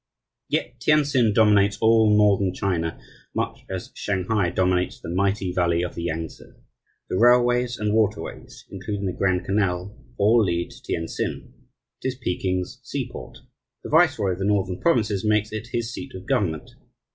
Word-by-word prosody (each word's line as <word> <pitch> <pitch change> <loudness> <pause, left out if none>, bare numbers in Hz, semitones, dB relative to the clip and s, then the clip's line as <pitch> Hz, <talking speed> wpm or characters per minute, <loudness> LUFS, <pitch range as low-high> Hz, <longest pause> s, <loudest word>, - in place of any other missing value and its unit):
Yet 125 - -2
Tientsin 140 -4 +3
dominates 105 -2 +4
all 110 -1 +4
Northern 100 -3 +3
China 85 -5 -2 0.4
much - - -2
as - - -5
Shanghai 100 -1 0
dominates 90 0 0
the 85 - -7
mighty 95 0 0
valley 85 -1 +1
of 90 - -4
the - - -6
Yangtse. 80 -1 -5 0.7
The - - -2
railways 120 0 +4
and 105 0 -1
waterways 105 -1 -2
(including 100 +1 -4
the 90 - -1
Grand 95 -1 0
Canal) 95 0 -1 0.2
all 110 +3 +4
lead 85 -3 -1
to - - -14
Tientsin. 80 0 -4 0.5
It - - -2
is 130 - -2
Peking's 90 -6 -2
seaport. - - -6 0.5
The - - -7
viceroy 100 -2 +3
of 90 - -4
the 95 - -1
Northern 95 -3 0
Provinces 105 - +1
makes 105 0 +1
it 110 +1 -5
his 120 0 -3
seat 135 -2 -8
of 95 - -9
government. 80 -6 -1
100 Hz, 155 wpm, -24 LUFS, 90-110 Hz, 0.7 s, dominates